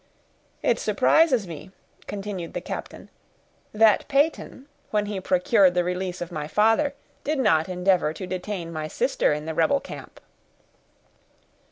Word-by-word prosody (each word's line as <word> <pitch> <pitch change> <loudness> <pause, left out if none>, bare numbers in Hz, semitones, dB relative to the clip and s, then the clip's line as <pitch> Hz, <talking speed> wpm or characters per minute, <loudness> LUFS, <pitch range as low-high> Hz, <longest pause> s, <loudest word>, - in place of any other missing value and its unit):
"It - - +2
surprises 275 -10 +3
me," 165 +1 -9 0.4
continued 195 -4 -6
the - - -1
captain, - - -8 0.6
"that 215 -1 +4
Peyton, 280 -1 0 0.2
when 210 -1 0
he 205 -2 -4
procured 185 +1 +3
the 180 - +2
release 180 0 -3
of 175 0 -5
my 150 -3 -4
father, 225 - +2 0.3
did 305 +1 -1
not 165 -10 +2
endeavor 180 -3 +2
to 160 +4 -7
detain 180 -2 -5
my 155 -1 -4
sister - - 0
in 150 +1 -2
the 160 - -3
rebel 280 - +2
camp." - - -10
190 Hz, 140 wpm, -24 LUFS, 175-220 Hz, 0.6 s, that